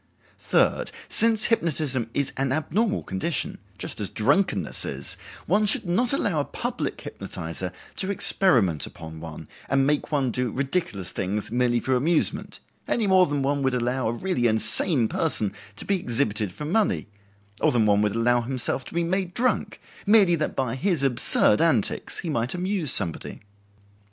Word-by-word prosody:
Third, - - +1 0.2
since 225 -1 +3
hypnotism 150 - -1
is 140 -1 -1
an 135 0 -1
abnormal 200 - -1
condition, 95 -1 -3 0.2
just - - -6
as - - -2
drunkenness 190 - 0
is, - - -5 0.3
one 210 +1 +2
should 200 - +1
not 230 +8 +1
allow 200 - 0
a - - +1
public - - -4
hypnotizer 85 +2 -6 0.3
to 190 - 0
experiment 120 - +5
upon 80 -1 -10
one 80 -1 -9 0.2
and 135 0 +2
make 145 +2 -1
one 135 -4 0
do 125 0 -2
ridiculous 135 - -3
things 100 +3 -3
merely 120 0 +1
for 130 - -1
amusement, 155 +6 +3 0.3
any 230 - 0
more 185 -2 +4
than 145 -1 -2
one 140 +1 0
would 130 -2 0
allow 125 0 -1
a - - 0
really 125 -3 -1
insane 115 - +3
person 110 -8 -1 0.2
to - - -8
be 195 -2 0
exhibited 110 - -1
for 150 - -8
money; 205 +7 0 0.6
or - - +3
than 115 -3 +2
one 105 -1 +3
would 105 0 0
allow 120 +1 +2
himself 130 +1 -3
to - - -10
be 170 - +1
made 180 +1 -2
drunk, 255 +1 -1 0.3
merely 205 -4 +5
that 155 -2 -2
by 130 -4 -2
his 165 +2 -1
absurd 130 -3 +3
antics - - 0
he 170 - -5
might 120 +3 -2
amuse 180 -4 +1
somebody. 85 -5 +3
135 Hz, 165 wpm, -24 LUFS, 115-180 Hz, 0.6 s, experiment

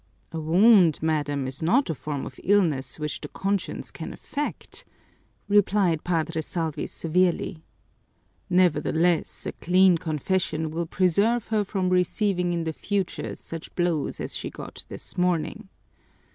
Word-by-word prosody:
"A 165 - -4
wound, 175 +1 +5
madam, 145 -3 0
is 130 +1 -6
not 235 - +3
a 165 - -1
form 145 -1 -4
of - - -9
illness 170 -10 +2
which 150 -2 -4
the - - -5
conscience 195 0 -3
can - - -7
affect," 295 +1 -5 0.6
replied 200 -5 +3
Padre 165 -2 0
Salvi 160 -2 -3
severely. 175 -1 0 0.9
"Nevertheless, 175 -1 +2
a - - -2
clean 180 -1 +4
confession 160 0 -1
will 165 +1 -2
preserve 200 +7 +2
her 215 -2 +2
from 190 -2 -1
receiving 180 0 +1
in 170 -1 -1
the 160 -1 -2
future 200 +2 -2
such 165 -1 -9
blows 175 -5 0
as - - -4
she - - -4
got - - -8
this - - -7
morning." 175 0 0
175 Hz, 135 wpm, -25 LUFS, 160-190 Hz, 0.9 s, wound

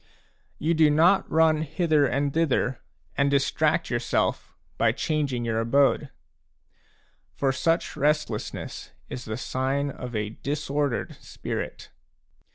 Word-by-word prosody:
You 160 +3 +1
do 155 -2 +5
not 165 +6 +4
run 160 -1 +3
hither 155 -2 +2
and 140 +1 0
thither 140 -5 +1 0.3
and 140 0 +2
distract 140 -1 +1
yourself - - 0 0.3
by - - +3
changing 140 -6 -1
your 115 -1 0
abode; 140 +4 +2 1.3
for 135 -1 +1
such 165 +6 0
restlessness 150 -7 -2 0.2
is 125 - -6
the 110 0 -4
sign 135 +3 -1
of 125 -2 -7
a 105 -1 -1
disordered 145 -2 -2
spirit. - - -6
140 Hz, 115 wpm, -26 LUFS, 130-155 Hz, 1.3 s, do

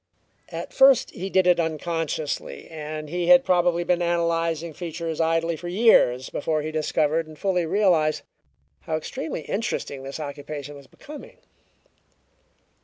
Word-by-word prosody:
At - - -7
first 270 -2 +5
he 190 +2 -5
did 190 -1 +3
it 180 -1 +4
unconsciously, 160 - -3
and 155 -1 -6
he 175 +2 -2
had 265 0 +7
probably 175 -1 +2
been 175 0 +1
analyzing 170 -1 0
features 165 0 -4
idly 165 +1 +1
for 175 +3 -8
years 175 - +3
before 155 0 -1
he 155 - -4
discovered 155 +1 0
and 155 -1 -12
fully 180 0 0
realized 165 -5 +2 0.6
how 160 - -3
extremely 155 0 -4
interesting 195 - -3
this 135 +3 -7
occupation 145 0 -7
was 140 -1 -13
becoming. 300 0 -12
165 Hz, 135 wpm, -24 LUFS, 155-175 Hz, 0.6 s, had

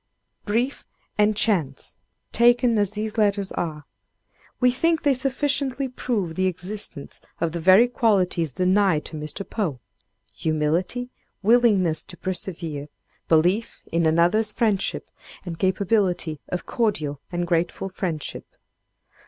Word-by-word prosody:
Brief 235 +6 -1 0.3
and 210 0 +2
chance 170 -12 0 0.3
taken 240 -1 +4
as 205 -2 +2
these 215 +2 -4
letters 200 -2 +1
are, 155 -4 -4 0.7
we 250 -1 +4
think 325 +5 +1
they 285 -2 +4
sufficiently 270 0 0
prove 225 -9 -2
the 185 +2 +1
existence 185 -4 -3 0.2
of 165 -1 0
the 170 - -4
very 190 +8 +6
qualities 185 - +1
denied 185 0 +2
to - - -7
Mr. 150 +6 -5
Poe 170 - -2 0.5
humility, 165 +10 -1 0.3
willingness 205 -7 +3
to 175 - -8
persevere, 170 -5 -4 0.4
belief 180 +8 +2
in 165 0 +2
another's 175 +7 +3
friendship, 210 -3 0 0.3
and 165 -2 -6
capability 185 -4 +1
of 180 - -3
cordial 155 - -1
and 175 0 -1
grateful 175 +2 -1
friendship! 175 -5 -5
190 Hz, 120 wpm, -24 LUFS, 165-225 Hz, 0.7 s, very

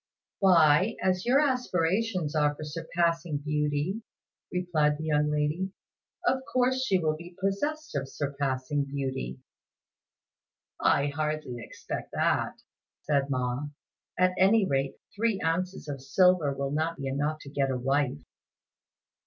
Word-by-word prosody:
"Why, 180 +1 +5
as 185 +2 +1
your 260 +3 +5
aspirations 195 - +1
are 150 -1 +2
for 155 - -7
'surpassing' 165 +1 -1
beauty," 150 +6 -1 0.5
replied 160 -5 +1
the 155 - -6
young 150 -1 +2
lady, 150 +6 -1 0.5
"of 265 -7 +3
course 255 +1 +2
she 195 -8 +3
will 155 -3 0
be 170 +3 -11
possessed 290 +12 -1
of 135 -2 -2
surpassing 140 0 -1
beauty." 135 - -4 1.4
"I 140 - +3
hardly 155 -3 -2
expect - - -7
that," - - 0 0.4
said 140 -2 +1
Ma; 130 +1 -1 0.5
"at 185 0 +4
any 200 +2 +5
rate 135 -2 0 0.2
three 220 -1 +1
ounces 180 +1 -1
of 140 -2 -5
silver 155 +2 +4
will 140 0 -3
not 160 +3 -1
be 135 - -5
enough 145 +3 -1
to 140 - -10
get 140 -1 +1
a 130 - 0
wife." 135 - 0
155 Hz, 130 wpm, -28 LUFS, 140-185 Hz, 1.4 s, Why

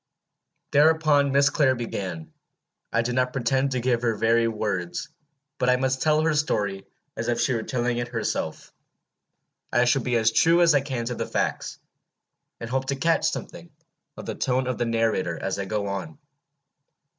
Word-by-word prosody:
Thereupon 150 -1 +4
Miss 140 0 +4
Clare 135 -3 +3
began. 95 -9 -5 0.6
I 115 - +1
do 125 +1 -2
not 125 0 0
pretend 130 +2 +1
to 130 - 0
give 120 -1 0
her 115 -2 0
very 115 +2 +2
words, 105 -6 -3 0.5
but 125 - +2
I 125 - +5
must 130 +1 -1
tell 155 0 +3
her 160 0 +2
story 100 -10 -1 0.3
as - - -4
if 120 -1 0
she 130 - +1
were 115 - -1
telling 120 0 -1
it 120 - -3
herself. 115 -2 -4 1.0
I 120 0 +3
shall 130 +2 +2
be 125 0 -1
as 115 -1 +3
true 165 +9 +4
as 165 -2 +5
I 145 - +3
can 130 -4 -4
to 125 - -2
the - - -4
facts, - - -2 0.8
and 115 - -6
hope 130 +2 -1
to 140 - 0
catch 165 +4 +2
something 170 0 -7 0.5
of - - -8
the - - -3
tone 130 -1 0
of 130 -1 -3
the 120 - +1
narrator 115 -7 0
as 95 +1 -3
I 100 - -2
go 105 +1 -2
on. 95 -6 -5
125 Hz, 180 wpm, -25 LUFS, 115-135 Hz, 1.0 s, I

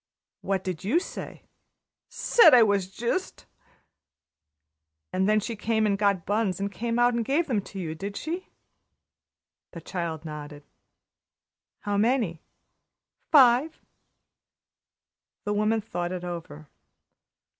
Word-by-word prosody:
"What 190 -1 -1
did 185 -1 -5
you 235 - +2
say?" - - -8 0.7
"Said 460 - +6
I 240 - +8
was 200 -3 +1
jist!" 240 - -3 1.7
"And 190 +2 +1
then 215 0 +4
she 225 +2 -4
came 220 +1 0
in 210 - +2
and 195 - -1
got 200 -4 +1
buns 205 -3 0
and 200 0 -2
came 230 +3 -3
out 240 0 +4
and 235 0 0
gave 285 +8 +1
them 235 -9 0
to 195 - -11
you, 160 -4 -4
did 200 +5 -6
she?" 345 +4 -5 1.3
The 170 - -8
child 165 -2 -5
nodded. 150 -1 -8 1.2
"How 205 -1 -1
many?" 215 -7 +1 0.9
"Five." 270 +2 +5 1.6
The 205 - -1
woman 215 +2 +1
thought 175 -4 -4
it 180 -1 -5
over. 165 -4 -7
205 Hz, 125 wpm, -26 LUFS, 180-235 Hz, 1.7 s, I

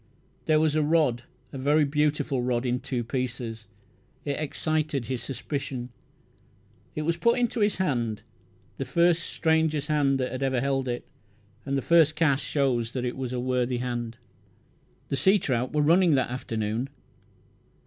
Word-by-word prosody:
There 155 -1 +4
was 155 -1 +2
a 155 - +2
rod 145 -6 +2 0.3
a 135 - -5
very 145 +3 +3
beautiful 150 -2 0
rod 120 0 0
in 125 0 0
two 125 -2 -3
pieces. 115 -3 -4 0.6
It 145 -1 -2
excited 155 -3 -1
his 130 +1 -3
suspicion. 135 -1 -4 1.0
It 155 - -2
was 170 +2 0
put 235 +7 +3
into 240 -1 0
his 205 -1 +2
hand, 120 - -1 0.5
the 135 - -3
first 170 +6 +3
stranger 160 -2 +1
hand 145 -2 +1
that 130 +1 -2
ever 130 -2 +1
held 135 0 0
it; 120 0 -3 0.6
and 140 0 0
the 135 - -2
first 160 -2 +5
cast 150 -3 +2
showed 130 -5 +1
that 125 +2 -4
it 125 - -2
was 130 -2 -4
a 125 - -2
worthy 125 0 0
hand. 120 -2 -3 0.9
The 140 - -1
sea 190 +9 +5
trout 130 -8 -1
were 150 -1 +2
running 170 +1 +5
that 130 -2 0
afternoon. 115 0 -2
135 Hz, 160 wpm, -27 LUFS, 125-155 Hz, 1.0 s, first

